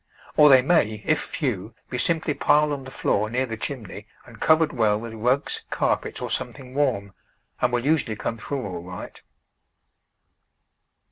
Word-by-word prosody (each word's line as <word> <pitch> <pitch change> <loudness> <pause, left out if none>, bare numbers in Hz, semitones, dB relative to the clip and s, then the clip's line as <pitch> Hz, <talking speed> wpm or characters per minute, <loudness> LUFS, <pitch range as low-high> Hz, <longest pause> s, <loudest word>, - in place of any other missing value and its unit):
Or 150 -1 +7
they 130 -2 +7
may, 110 - +2
if - - +3
few, - - -3 0.2
be - - -2
simply 160 -2 +1
piled 150 +1 +3
on 135 -2 -5
the - - -8
floor 105 -4 0
near 125 +3 0
the 115 -3 -5
chimney 110 -4 -5 0.2
and 115 -2 -14
covered 160 -1 +4
well 110 -4 +2
with 115 0 -7
rugs, 125 +5 0
carpets, - - -1
or - - -4
something 130 -2 -3
warm, 125 -9 0 0.5
and 125 - +2
will 120 0 -1
usually 145 -7 +1
come 115 +1 -4
through 135 +1 -4
all 90 -3 -5
right. 90 +1 -9
125 Hz, 160 wpm, -24 LUFS, 110-145 Hz, 0.5 s, Or